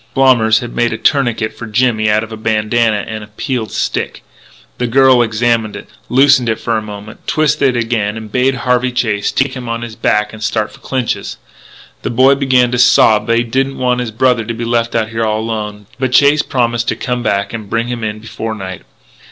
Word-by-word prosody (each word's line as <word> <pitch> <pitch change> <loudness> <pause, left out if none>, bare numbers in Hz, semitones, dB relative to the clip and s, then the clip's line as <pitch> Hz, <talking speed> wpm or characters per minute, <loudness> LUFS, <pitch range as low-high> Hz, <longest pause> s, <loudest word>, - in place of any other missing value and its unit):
Blommers 120 -5 +4
had 120 -1 -7
made 120 0 +1
a - - -3
tourniquet 120 -6 0
for 115 - -8
Jimmy 110 -1 +1
out 105 +1 +2
of 110 - -9
a - - -5
bandanna 110 0 0
and 110 -1 -5
a - - -11
peeled 110 +2 -4
stick. - - -3 0.6
The 125 - 0
girl 130 0 +5
examined 115 -1 0
it, - - -9 0.2
loosened 130 -2 +4
it 110 - -1
for 115 - -1
a 110 - 0
moment, 105 0 -10
twisted 140 -4 +1
it - - +1
again, 110 -2 -1
and 110 -1 -9
bade 130 +3 +2
Harvey 125 0 +2
Chase 110 -5 -1
take 135 +1 0
him 125 -3 -6
on 115 0 -3
his 115 -2 -7
back 105 0 0
and 110 - -10
start 110 -1 -1
for 135 - -16
Clinch's. 130 -3 -3 0.6
The - - -3
boy 130 +3 +4
began 130 -3 +2
to 125 - -1
sob 110 -3 +5
that 115 0 +2
he 120 - +2
didn't 135 +3 -1
want 125 -1 0
his 125 -2 -2
brother 120 +1 +1
to 115 +1 -5
be 115 +1 -4
left 115 0 0
out 110 -1 0
there 115 0 -2
all 110 -1 0
alone; 105 -2 -5
but 130 -1 -1
Chase 145 +3 +5
promised 120 -4 -1
to - - 0
come 125 -1 -3
back 100 -2 -1
and 110 -3 -6
bring 115 0 -1
him 120 -2 -4
in 105 -1 -3
before 110 0 -6
night. 95 -3 -7
115 Hz, 215 wpm, -15 LUFS, 110-125 Hz, 0.6 s, girl